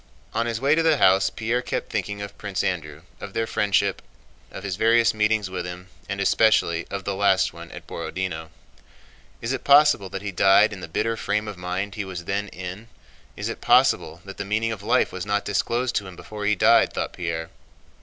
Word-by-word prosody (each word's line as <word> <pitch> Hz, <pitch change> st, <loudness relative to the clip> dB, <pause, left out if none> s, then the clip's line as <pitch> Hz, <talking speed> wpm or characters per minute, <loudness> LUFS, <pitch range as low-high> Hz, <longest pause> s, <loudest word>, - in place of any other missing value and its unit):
On 115 Hz, +1 st, 0 dB
his 115 Hz, -1 st, -2 dB
way 140 Hz, +3 st, +3 dB
to 160 Hz, -, +3 dB
the 160 Hz, -2 st, +3 dB
house 95 Hz, -3 st, +4 dB
Pierre 115 Hz, +2 st, -1 dB
kept 125 Hz, -, -4 dB
thinking 100 Hz, -1 st, -3 dB
of 100 Hz, 0 st, -8 dB
Prince 100 Hz, -3 st, -3 dB
Andrew, 80 Hz, -4 st, -3 dB, 0.2 s
of 100 Hz, -, -8 dB
their 115 Hz, 0 st, 0 dB
friendship, 100 Hz, -3 st, +1 dB, 0.5 s
of -, -, -9 dB
his 95 Hz, -3 st, -3 dB
various 115 Hz, +3 st, +4 dB
meetings 105 Hz, -1 st, +1 dB
with 95 Hz, -1 st, -4 dB
him, 90 Hz, +1 st, -8 dB, 0.2 s
and 100 Hz, -, -3 dB
especially 100 Hz, -4 st, +2 dB
of 100 Hz, -1 st, -5 dB
the 100 Hz, -, -2 dB
last 95 Hz, -1 st, +2 dB
one -, -, -10 dB
at -, -, -10 dB
Borodinó. 80 Hz, -4 st, -5 dB, 0.9 s
"Is 115 Hz, +3 st, -2 dB
it 130 Hz, -, -4 dB
possible 140 Hz, -9 st, +5 dB
that 95 Hz, +1 st, -6 dB
he 100 Hz, -, -3 dB
died 100 Hz, +3 st, +5 dB
in 100 Hz, -, -8 dB
the -, -, -6 dB
bitter 115 Hz, +7 st, -1 dB
frame 105 Hz, 0 st, -2 dB
of 105 Hz, -, -5 dB
mind 90 Hz, +2 st, -4 dB
he 105 Hz, -, -4 dB
was 90 Hz, -3 st, -7 dB
then 100 Hz, +3 st, -2 dB
in? 95 Hz, +5 st, -8 dB, 0.5 s
Is -, -, -3 dB
it -, -, -5 dB
possible 80 Hz, +2 st, +3 dB
that 95 Hz, 0 st, -9 dB
the -, -, -3 dB
meaning 110 Hz, +3 st, -1 dB
of 110 Hz, -3 st, -5 dB
life 110 Hz, +3 st, +2 dB
was 95 Hz, -, -5 dB
not 105 Hz, 0 st, 0 dB
disclosed 120 Hz, +5 st, 0 dB
to 100 Hz, -, -3 dB
him 90 Hz, -, -10 dB
before 105 Hz, +2 st, -6 dB
he 105 Hz, -, +3 dB
died?" -, -, +4 dB
thought -, -, -3 dB
Pierre. 85 Hz, -2 st, -4 dB
100 Hz, 210 wpm, -24 LUFS, 95-110 Hz, 0.9 s, possible